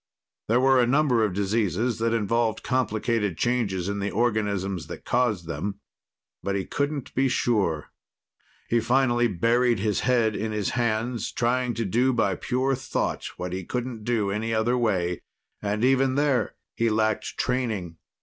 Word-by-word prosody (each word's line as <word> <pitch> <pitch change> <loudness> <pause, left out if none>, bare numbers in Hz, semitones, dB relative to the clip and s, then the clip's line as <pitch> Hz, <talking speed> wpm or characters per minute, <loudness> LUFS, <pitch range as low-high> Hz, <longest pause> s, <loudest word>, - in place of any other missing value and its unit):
There 115 +3 +3
were 130 0 +5
a 120 - +2
number 130 -3 +3
of 100 -4 0
diseases 105 +2 0
that 115 0 +1
involved 115 0 0
complicated 110 -6 0
changes 100 -7 0
in 100 0 -2
the 100 +1 -1
organisms 100 - -1
that - - -9
caused 115 -8 +1
them. 100 +5 -4 0.6
But 100 - -2
he 95 - -1
couldn't 145 -2 -2
be 135 +1 +2
sure. 100 -11 0 0.8
He 120 - +2
finally 120 0 +2
buried 115 +5 +2
his 105 0 0
head 115 -4 +2
in 110 0 -2
his 105 -2 -1
hands, 120 -1 -1
trying 125 0 0
to 115 - -1
do 125 +7 +2
by 110 -5 +2
pure 130 +8 0
thought 130 - -2
what 90 0 -4
he 95 0 -3
couldn't 120 +2 -4
do 110 -4 0
in 100 - -1
any 115 +1 -1
other 115 +3 +2
way. 95 -8 0 0.4
And 105 +2 -1
even 135 0 +3
there, 140 -6 +1 0.2
he 115 0 +1
lacked 110 0 0
training. 110 -10 -1
115 Hz, 160 wpm, -25 LUFS, 100-125 Hz, 0.8 s, were